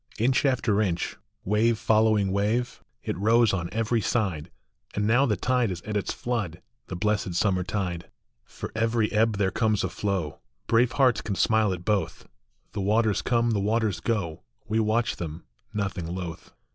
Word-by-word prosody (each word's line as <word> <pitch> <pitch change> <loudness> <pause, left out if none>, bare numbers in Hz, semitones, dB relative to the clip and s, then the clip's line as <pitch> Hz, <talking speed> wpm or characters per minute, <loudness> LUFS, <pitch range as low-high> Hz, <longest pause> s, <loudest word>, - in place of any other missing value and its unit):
Inch 130 +5 +2
after 120 -6 +2
inch, 90 -5 -1 0.3
wave 110 +3 +2
following 110 -3 +3
wave, 105 +5 0 0.2
it - - -2
rose 115 +1 +4
on 85 -2 -2
every 115 +1 0
side; 95 -10 -1 0.5
And 105 - 0
now 120 +6 +4
the 105 -4 +1
tide 125 +2 +1
is 90 -1 -5
at 105 0 -5
its 100 - -1
flood, 100 -9 -3 0.3
the 90 - -5
blessed 100 -2 -1
summer 95 0 +2
tide. 90 -3 -3 0.3
For - - -8
every 115 0 +1
ebb 110 -1 +2
there 95 -2 +1
comes 110 0 +1
a - - -1
flow; 95 -7 -2 0.3
brave 120 - +3
hearts 125 -5 +3
can 100 - -3
smile 110 0 +3
at 90 -1 -5
both. 105 -2 -1 0.4
The 100 - -4
waters 105 +1 +2
come, 120 -1 +1
the 105 - +1
waters 110 0 0
go; 95 -9 -2 0.3
we 110 +1 +1
watch 110 +2 +1
them, 80 0 -6 0.3
nothing 100 -4 -3
loath. 85 -1 -6
105 Hz, 170 wpm, -26 LUFS, 95-115 Hz, 0.5 s, rose